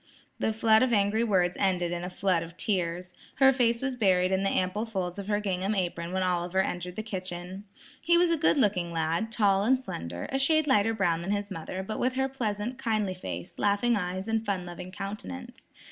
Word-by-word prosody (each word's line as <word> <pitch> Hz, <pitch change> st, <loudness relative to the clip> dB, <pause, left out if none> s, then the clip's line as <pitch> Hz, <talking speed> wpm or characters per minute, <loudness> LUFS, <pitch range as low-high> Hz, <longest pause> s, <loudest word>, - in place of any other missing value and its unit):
The -, -, +1 dB
flood 220 Hz, 0 st, +4 dB
of 255 Hz, -1 st, +2 dB
angry 205 Hz, +2 st, +2 dB
words 180 Hz, -5 st, +2 dB
ended 180 Hz, -3 st, +1 dB
in 175 Hz, 0 st, -3 dB
a 180 Hz, -, -3 dB
flood 185 Hz, -2 st, +1 dB
of 165 Hz, +1 st, -9 dB
tears. 180 Hz, -2 st, -2 dB, 0.2 s
Her 270 Hz, 0 st, +6 dB
face 235 Hz, -1 st, +1 dB
was 265 Hz, -1 st, 0 dB
buried 185 Hz, -5 st, +3 dB
in 190 Hz, 0 st, +2 dB
the 195 Hz, -, +1 dB
ample 185 Hz, +4 st, 0 dB
folds 190 Hz, -5 st, -3 dB
of 200 Hz, -, -6 dB
her 205 Hz, -1 st, +1 dB
gingham 195 Hz, 0 st, -1 dB
apron 175 Hz, -2 st, -2 dB
when 190 Hz, 0 st, 0 dB
Oliver 180 Hz, 0 st, 0 dB
entered 180 Hz, -1 st, -4 dB
the 215 Hz, -, -4 dB
kitchen. 185 Hz, -1 st, -6 dB, 0.4 s
He 340 Hz, +1 st, +4 dB
was 345 Hz, 0 st, +4 dB
a -, -, +4 dB
good 300 Hz, -, +3 dB
looking 195 Hz, -8 st, +1 dB
lad, 165 Hz, +7 st, -1 dB
tall 200 Hz, -3 st, +3 dB
and 255 Hz, +4 st, +3 dB
slender, 85 Hz, -, -6 dB
a 270 Hz, -, 0 dB
shade 310 Hz, +3 st, +3 dB
lighter 225 Hz, -5 st, +3 dB
brown 175 Hz, -5 st, +1 dB
than 175 Hz, -, -5 dB
his 205 Hz, 0 st, -1 dB
mother, 185 Hz, +2 st, -5 dB
but 215 Hz, +3 st, -5 dB
with 255 Hz, +1 st, +1 dB
her 265 Hz, 0 st, +1 dB
pleasant, 240 Hz, -1 st, -3 dB
kindly 215 Hz, -6 st, 0 dB
face, 180 Hz, 0 st, -7 dB
laughing 205 Hz, +4 st, +2 dB
eyes 185 Hz, 0 st, -3 dB
and 225 Hz, 0 st, 0 dB
fun 195 Hz, -4 st, -2 dB
loving 175 Hz, +1 st, -8 dB
countenance. 195 Hz, -, -7 dB
195 Hz, 210 wpm, -28 LUFS, 180-225 Hz, 0.4 s, Her